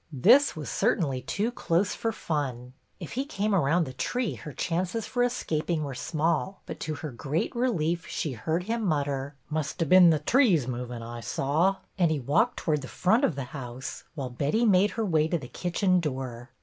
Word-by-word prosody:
This 235 - +5
was 155 -2 -6
cer - - +2
tainly 135 -7 -2
too 220 +4 -1
close 185 -3 0
for 225 - -1
fun. 130 - -3 0.3
If 170 - -7
he 265 - -1
came 215 -7 -1
around 170 -1 +3
the 130 -4 -6
tree 245 - -1
her 150 - -8
chances 180 - -2
for 245 - -1
escaping 165 -9 -1
were 140 -2 -4
small, 165 +7 -1
but - - -7
to 155 0 -3
her 155 -1 -6
great 145 - -2
relief 175 -9 0
she 155 - -2
heard 160 +9 -2
him 225 +3 -2
mutter, 145 -5 -1
— - - -42
" - - -38
Must 155 +2 -2
hov 165 -4 0
bin 185 -2 +8
the 160 - +4
threes 175 - +3
movin', 125 -1 -5
I 120 +1 -7
saw; 155 +11 +1
" - - -42
and 175 -3 +4
he 155 -2 0
walked 145 - +1
towards 150 -3 0
the 130 - -7
front 220 - +2
of 175 - +2
the 140 - -3
house, 130 -2 -6
while 135 -5 -4
Betty 145 - +1
made 200 -1 +5
her 225 - +1
way 160 -5 +2
to 170 - 0
the 135 -6 -8
kitchen 180 - +1
door. 130 -6 -4
160 Hz, 210 wpm, -27 LUFS, 135-195 Hz, 0.3 s, bin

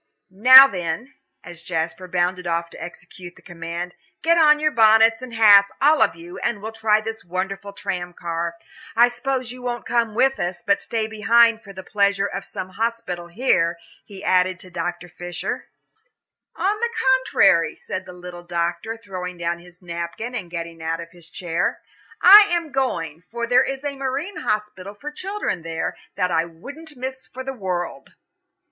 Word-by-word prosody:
Now 255 +7 +10
then," 185 - -4 0.3
as 175 -2 -11
Jasper 170 +2 -3
bounded 180 0 -1
off 170 0 -2
to - - -9
execute 175 +1 -11
the - - -19
command, 175 0 -6 0.3
"get 335 +1 +4
on 300 -2 +5
your 310 0 +1
bonnets 225 0 +5
and 250 -3 -8
hats, 205 -3 +7
all 300 +3 +4
of - - +3
you, 175 +3 -10
and 225 - -2
we'll 220 +2 -6
try 220 -1 +2
this 225 0 -6
wonderful 195 +3 -4
tram 185 -3 -4
car. 170 -1 -4 0.4
I 240 +1 +6
suppose 255 0 -3
you 250 0 -10
won't 240 -1 -4
come 230 -3 0
with 265 +3 +2
us, 175 0 -3
but 200 -1 +3
will - - -13
stay 225 -2 -2
behind 225 +1 +3
for 200 - -12
the 190 -1 -9
pleasures 200 0 +1
of 195 - -5
some 185 - -6
hospital 220 -4 -3
here," 170 -4 +1 0.3
he 195 -2 -12
added 185 0 +2
to 185 - -12
Dr. 175 0 -4
Fisher. 175 +1 -6 0.9
"On 415 +2 0
the 470 +1 0 0.3
contrary," 195 -10 +3
said 185 - -6
the - - -8
little 180 -1 -10
doctor, 175 +5 -3
throwing 185 -5 -7
down 170 0 -2
his 180 +1 -18
napkin 170 +7 -5
and 200 -8 -5
getting 170 -1 -6
out 165 0 -2
of 170 0 -9
his 170 -2 -16
chair. 175 -2 -2 0.4
"I 405 +3 +10
am 335 -3 -1
going, 165 - -2
for 235 0 -3
there 245 +1 +4
is 270 +1 -4
a 285 -1 -3
marine 275 +8 -4
hospital 210 -2 -3
for 295 +8 -7
children 375 - -4
there, 165 0 -4 0.2
that 180 0 0
I 165 0 +2
wouldn't 280 - -11
miss 260 +1 -6
for 260 +1 -8
the 270 0 -5
world." 180 - -5
195 Hz, 180 wpm, -22 LUFS, 175-240 Hz, 0.9 s, Now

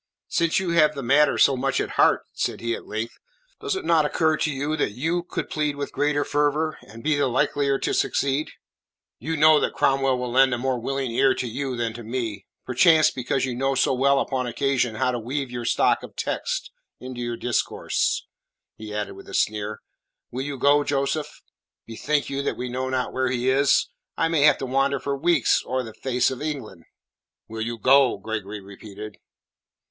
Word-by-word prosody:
"Since 170 -1 +1
you 185 -2 0
have 155 -2 +4
the 140 - -5
matter 140 +4 +4
so 140 - +5
much 135 +1 0
at - - -2
heart," - - +3
said - - -2
he 115 0 -2
at - - -7
length, 110 +2 -5 0.4
"does 420 -2 -2
it 380 - -5
not 165 -2 +4
occur 155 +2 +1
to 155 0 -1
you 145 +3 -2
that 105 - -1
you 165 +9 -1
could 175 - -5
plead 150 -1 -1
with 140 0 -5
greater 145 0 0
fervour, 150 +1 0
and 115 +2 -13
be 155 -1 +2
the 145 -1 +1
likelier 140 +2 +1
to - - -2
succeed?" 140 +2 0 0.7
"You 160 +1 -3
know 155 0 +6
that - - -1
Cromwell 135 -1 +2
will 125 -1 -4
lend 130 0 +4
a - - -4
more 130 0 -1
willing 135 +1 -2
ear 130 +3 +3
to 125 - -3
you 130 +2 -3
than 115 -2 -2
to 120 - -8
me 110 -4 -4 0.2
perchance 155 +5 +5
because 130 +1 -1
you 130 - -3
know 135 +2 0
so 135 - +2
well 135 +2 +3
upon 130 -2 -1
occasion 130 -2 0
how 125 +4 +1
to 120 - -3
weave 130 +3 -4
your 120 -1 -5
stock - - +2
of - - -11
texts - - -3 0.3
into 125 -1 -7
your 120 -1 -3
discourse," 120 0 -1 0.5
he 110 -1 -8
added 105 0 -3
with - - -13
a - - -5
sneer. 105 0 -1 0.5
"Will 125 - -4
you 140 0 -4
go, 145 +3 +4
Joseph?" 145 +2 -2 0.4
"Bethink 140 +6 -1
you 140 0 -3
that - - -2
we 125 0 -4
know 130 +1 -3
not 130 -1 -2
where 130 -1 0
he 125 0 0
is. 140 +1 +3 0.3
I 165 - +1
may 165 -3 +1
have 150 -2 +6
to - - -4
wander 135 +1 +1
for 140 0 -2
weeks 160 -1 +2
o'er 130 0 -1
the 110 -2 -9
face 125 +1 0
of 130 - -6
England." 130 - -5 0.6
"Will 110 0 -6
you 115 +1 -3
go?" 130 +2 +4
Gregory 105 0 -5
repeated. 100 +1 -10
135 Hz, 200 wpm, -24 LUFS, 120-145 Hz, 0.7 s, know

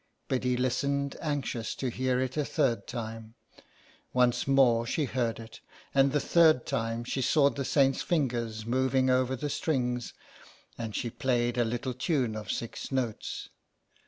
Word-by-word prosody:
Biddy 125 -1 0
listened, 140 +3 0
anxious 140 -7 -2
to 130 - -2
hear 130 +1 0
it 130 0 -2
a 150 - +1
third 135 -5 0
time. 115 -1 -6 0.8
Once 125 0 +2
more 130 -4 +4
she 145 +6 -1
heard 120 -4 -1
it, 115 -1 -10 0.3
and 135 0 +4
the 145 - +2
third 160 -5 +4
time 115 +1 -2
she 130 +2 -2
saw 140 +1 +4
the 140 - -3
saint's 135 0 +2
fingers 120 - -1
moving 130 +2 +2
over 130 0 +2
the 145 +3 -3
strings; 125 -5 -1 0.6
and 115 -3 -5
she 120 - -2
played 120 -2 0
a 120 - +2
little 120 +3 -2
tune 125 -3 0
of 105 -3 -6
six 115 - -5
notes. 125 -5 -3
125 Hz, 155 wpm, -29 LUFS, 120-135 Hz, 0.8 s, more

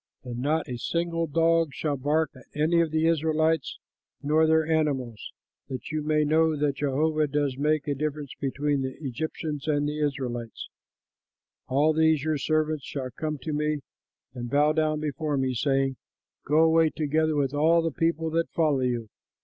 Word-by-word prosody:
But 120 -2 -6
not 150 +5 0
a 125 - -4
single 165 +4 -1
dog 165 -1 +2
shall 150 -2 -1
bark 145 +3 0
at 130 - -15
any 170 +3 +3
of 165 - +1
the 160 +1 +1
Israelites 160 -2 +1 0.5
nor 155 +2 +3
their 160 0 +3
animals, 140 -8 -1 0.4
that 130 +2 -6
you 155 0 -1
may 150 0 +2
know 160 +1 +3
that 145 -1 0
Jehovah 150 +2 +1
does 145 -2 -1
make 150 +2 0
a 145 - +1
difference 150 0 -4
between 140 +1 0
the 130 -1 -4
Egyptians 150 +1 -4
and 145 -1 +1
Israelites. 135 -6 -3 1.0
All 145 +4 +3
these 160 -2 +3
your 155 -2 0
servants 155 -1 0
shall 130 -2 -5
come 155 +5 -3
to 155 - -3
me 150 0 -1 0.5
and 120 -2 -6
bow 150 +3 +3
down 155 -1 0
before 150 -1 -2
me, 130 -1 0
saying, 135 +1 0 0.5
'Go 155 +2 +4
away, 160 0 +4
together 155 +1 0
with 140 -2 0
all 165 +3 +3
the 165 - 0
people 165 +1 0
that 165 +1 0
follow 155 -4 +1
you.' 120 -3 -1
150 Hz, 165 wpm, -26 LUFS, 140-160 Hz, 1.0 s, Go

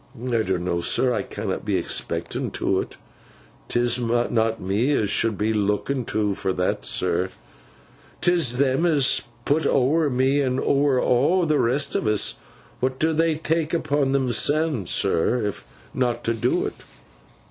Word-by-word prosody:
'I 120 -2 -1
donno, 90 -3 -1
sir. 125 +8 +2
I - - -1
canna - - -4
be - - -2
expecten - - -3
to - - 0
't. - - -14 0.7
'Tis 120 0 +1
not 115 -1 0
me 105 +10 0
as 105 -7 0
should 110 -1 +2
be 110 +2 0
looken 105 +5 -1
to 105 -2 -1
for 95 0 -2
that, 90 0 -1
sir. - - +1 0.9
'Tis 165 -9 +2
them 140 +5 +2
as 160 -3 +2
is 135 -2 +3 0.2
put 155 +3 +1
ower 145 +4 +2
me, 135 +2 +1
and 130 -1 0
ower 140 -2 +2
aw 150 +11 +2
the 155 -2 +1
rest 140 +4 +1
of 115 - -1
us. 105 -1 +1 0.4
What 130 +1 -1
do 160 +3 +1
they 165 0 +1
tak 160 +1 -1
upon 145 -4 0
themseln, 135 - +1
sir, 100 +8 +1
if 105 - -4 0.3
not 125 -2 -1
to 115 - 0
do't? 115 - -1
125 Hz, 155 wpm, -23 LUFS, 110-145 Hz, 0.9 s, is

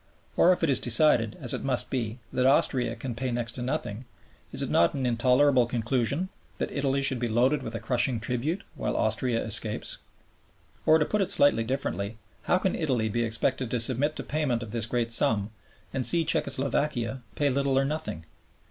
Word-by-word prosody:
Or 180 - +5
if 180 - 0
it 165 - +2
is 130 - +3
decided 115 -3 +4
(as 125 - +2
it - - -4
must 130 -2 -1
be) 115 -3 -3 0.2
that 125 - +2
Austria 130 -4 +2
can 120 +2 -6
pay 125 +3 -3
next 120 -1 -2
to 125 - -7
nothing, 125 -3 -4 0.5
is - - -1
it - - -4
not 85 - +3
an 135 -2 -2
intolerable 125 +2 +3
conclusion 125 +8 -1 0.3
that - - -3
Italy 140 -1 -1
should 135 -2 +3
be 120 - -1
loaded 125 +6 +1
with 115 -2 -7
a - - -3
crushing 125 -1 0
tribute, 125 - -3
while - - -3
Austria 115 +2 0
escapes? 110 -1 +2 0.9
Or, 155 - +6
to 150 - +1
put 210 +5 -1
it 190 - 0
slightly 130 -6 +4
differently, 115 -4 -3 0.3
how 180 - +3
can 185 0 -1
Italy 125 -9 -1
be 120 +3 -1
expected 115 +2 -1
to 125 - -1
submit 130 +6 +1
to - - -6
payment 135 -6 -2
of 110 - -9
this 115 -1 -1
great 115 0 -2
sum 110 -2 +2 0.4
and 135 - -1
see 165 +4 +5
Czecho 150 - 0
Slovakia 135 -3 -1
pay 145 -1 +1
little 140 0 0
or 135 - +2
nothing? 145 - -5
125 Hz, 195 wpm, -27 LUFS, 115-140 Hz, 0.9 s, Or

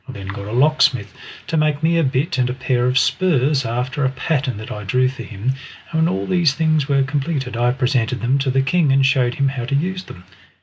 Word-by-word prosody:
I - - -6
then 95 -5 -8
got 100 0 -6
a - - -6
lock 145 +6 +2
smith 105 -6 +2 0.3
to 165 - -2
make 155 -1 +1
me 165 +1 +3
a - - +2
bit 140 +3 0
and 125 -1 +1
a 125 - -3
pair 125 -2 0
of 125 +1 +1
spurs 140 -5 +2
after 125 +4 -2
a 135 - +2
pattern 135 -2 -2
that 110 +4 -8
I 105 -3 -6
drew 125 +6 +2
for 135 - -8
him, 115 +4 -3 0.4
and 160 - 0
when 160 - +3
all 95 - -2
these 170 - +2
things 155 -3 +1
were 140 -2 +2
completed 135 -2 -2
I 120 +1 +2
presented 125 -2 0
them 130 +3 +1
to 135 0 -1
the 135 +1 +2
king 150 +1 +2
and 135 0 +4
showed 130 -3 +2
him 140 -1 +1
how 130 -3 -4
to 140 +3 -1
use 185 +5 -2
them. 90 - -12
135 Hz, 250 wpm, -20 LUFS, 125-150 Hz, 0.4 s, and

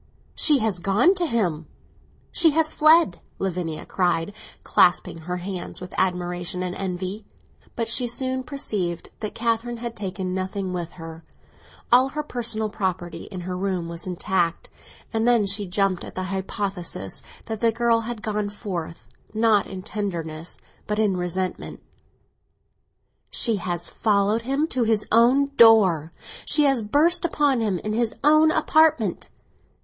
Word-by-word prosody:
"She 300 -3 +4
has 220 -7 -1
gone 205 - +3
to 360 -3 -1
him, 175 - -1 0.6
she 330 - +5
has 315 -1 +2
fled!" 310 - +4 0.2
Lavinia 175 -4 -3
cried, 175 0 0 0.3
clasping 175 -1 +3
her 180 +3 -4
hands 180 0 -6
with 180 0 -9
admiration 180 0 -1
and 180 -1 -3
envy. 185 +2 -4 0.5
But 230 -2 -2
she 245 +2 0
soon 260 +2 -2
perceived 205 - -3
that 215 -2 -5
Catherine 230 +1 -1
had 235 0 -6
taken 190 -2 -4
nothing 190 0 -3
with 175 -2 -4
her—all 165 +9 -2
her 300 +2 -4
personal 230 -5 -2
property 185 -4 -3
in 185 -3 -7
her 180 +1 -4
room 185 -2 -2
was 170 +2 -7
intact—and 185 +5 -3
then 235 -4 +4
she 200 0 -1
jumped 190 0 0
at - - -10
the 185 - -3
hypothesis 190 - -3 0.2
that 220 -1 -4
the 230 0 +3
girl 230 0 +2
had 230 -1 -6
gone 210 -1 -1
forth, 180 -6 -6 0.3
not 220 -2 +3
in 185 -1 -7
tenderness, 170 -6 -5 0.3
but 210 - -1
in 210 -3 +2
resentment. 180 +1 -3 1.5
"She 230 -4 +1
has 175 -2 -3
followed 210 +1 +1
him 275 +5 0
to 255 - -1
his 220 -2 +2
own 255 +5 +4
door—she 215 - +4
has 270 -4 +3
burst 295 - +2
upon 290 -7 +1
him 205 -5 0
in 215 +5 -4
his 230 0 0
own 310 +2 +6
apartment!" 310 - +2
205 Hz, 140 wpm, -24 LUFS, 180-235 Hz, 1.5 s, own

